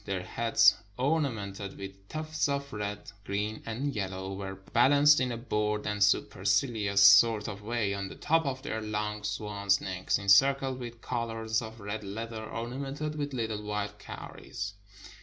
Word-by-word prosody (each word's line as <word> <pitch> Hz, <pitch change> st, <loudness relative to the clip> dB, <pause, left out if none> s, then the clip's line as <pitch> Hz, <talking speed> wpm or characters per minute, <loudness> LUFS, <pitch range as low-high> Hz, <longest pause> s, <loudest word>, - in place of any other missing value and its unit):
Their 95 Hz, -2 st, -3 dB
heads, 115 Hz, +2 st, +4 dB, 0.2 s
ornamented 110 Hz, -9 st, -1 dB
with 95 Hz, 0 st, -9 dB
tufts 155 Hz, -1 st, -1 dB
of 140 Hz, 0 st, -2 dB
red, 105 Hz, -1 st, -5 dB
green, 105 Hz, +2 st, -3 dB
and 135 Hz, +6 st, -2 dB
yellow, 95 Hz, -1 st, -3 dB
were 95 Hz, 0 st, -5 dB
balanced 140 Hz, +9 st, +5 dB
in 130 Hz, -1 st, 0 dB
a 120 Hz, -, -3 dB
bored 105 Hz, -3 st, -1 dB
and 105 Hz, -1 st, +1 dB
supercilious 100 Hz, +1 st, +2 dB
sort 105 Hz, +2 st, +7 dB
of 100 Hz, -2 st, -6 dB
way 110 Hz, -2 st, -1 dB
on 100 Hz, 0 st, -3 dB
the -, -, -9 dB
top 165 Hz, -1 st, +1 dB
of 130 Hz, -1 st, -3 dB
their 110 Hz, -5 st, -3 dB
long 105 Hz, -1 st, -3 dB
swans' 105 Hz, -1 st, 0 dB
necks, 95 Hz, -1 st, -1 dB
encircled 130 Hz, +6 st, +4 dB
with 120 Hz, -2 st, -8 dB
collars 115 Hz, -2 st, -2 dB
of 110 Hz, 0 st, -8 dB
red 105 Hz, +1 st, -5 dB
leather 110 Hz, +2 st, -5 dB
ornamented 135 Hz, +7 st, -4 dB
with 145 Hz, -1 st, -3 dB
little 110 Hz, -3 st, -2 dB
white 105 Hz, 0 st, -4 dB
cow -, -, -8 dB
ries. 100 Hz, -1 st, -6 dB
110 Hz, 160 wpm, -30 LUFS, 100-125 Hz, 0.2 s, sort